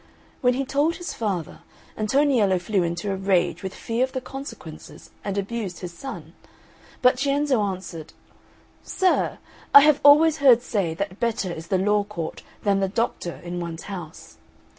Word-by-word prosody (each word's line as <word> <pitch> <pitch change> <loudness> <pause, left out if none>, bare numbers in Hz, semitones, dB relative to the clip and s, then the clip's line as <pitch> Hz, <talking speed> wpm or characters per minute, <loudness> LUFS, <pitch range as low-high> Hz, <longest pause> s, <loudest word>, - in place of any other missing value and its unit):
When 250 -1 +3
he 270 +1 -1
told 290 +5 +1
his 350 - -6
father, 195 -8 -3 0.4
Antoniello 220 -4 +2
flew 185 +2 0
into 175 +3 -2
a - - -1
rage 185 -3 +1
with 190 -1 -6
fear 230 +2 -1
of 260 - -2
the 260 - -1
consequences 270 +2 -10
and 200 -1 -3
abused 200 -2 -4
his 175 -2 -6
son; 170 - -8 0.7
but 250 0 +5
Cienzo 280 -3 +1
answered, 185 -5 -5 0.7
"Sir, 375 -1 0 0.4
I 280 - +13
have 300 0 +4
always 305 +2 +7
heard 255 -4 +5
say 190 -9 -1
that 200 +2 -4
better 220 -6 -1
is 165 0 -8
the 190 - +1
law 205 +2 +2
court 175 -6 -6 0.2
than 200 -1 +2
the 195 - +1
doctor 210 -5 -2
in 175 0 -5
one's 170 -1 -6
house. 175 -6 -9
205 Hz, 160 wpm, -24 LUFS, 180-260 Hz, 0.7 s, I